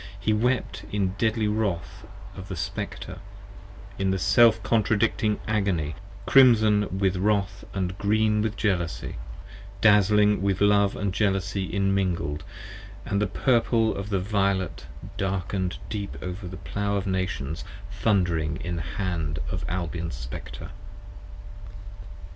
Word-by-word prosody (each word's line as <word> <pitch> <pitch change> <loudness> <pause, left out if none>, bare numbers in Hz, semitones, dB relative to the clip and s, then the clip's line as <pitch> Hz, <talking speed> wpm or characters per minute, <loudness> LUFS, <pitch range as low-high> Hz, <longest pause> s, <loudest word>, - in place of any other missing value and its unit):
He 110 +2 +1
wept 125 +4 0
in 100 -2 +1
deadly 110 -1 +1
wrath 105 -5 -2 0.3
of 95 - -8
the 95 - -5
Spectre, 75 - -5 0.8
in 95 -1 +1
self 110 +4 +5
contradicting 110 0 +1
agony, 95 -8 0 0.3
Crimson 110 -7 +5
with 95 -1 +1
Wrath 100 -1 0 0.2
& 90 +1 -3
green 105 +1 +2
with 110 0 -2
Jealousy, 85 - -1 0.6
dazling 105 -1 +5
with 95 -1 +1
Love 100 -1 +4
And 100 -2 -2
Jealousy 95 -1 0
immingled, 95 -5 0 0.4
& - - -13
the 100 +1 +2
purple 115 +1 +2
of 100 +1 -5
the 100 -2 +1
violet 100 -1 -1 0.3
darken'd 95 -1 -2
deep 100 -2 -4
30 - - -8
Over 90 +1 -5
the 90 +1 -7
Plow 100 +2 -2
of 100 -1 -1
Nations 95 -5 -2 0.3
thund'ring 90 -7 +1
in 85 +1 -3
the - - -2 0.2
hand 85 -6 -2
of - - -3
Albion's 85 -3 -3
Spectre. - - -8
100 Hz, 125 wpm, -26 LUFS, 90-105 Hz, 0.8 s, self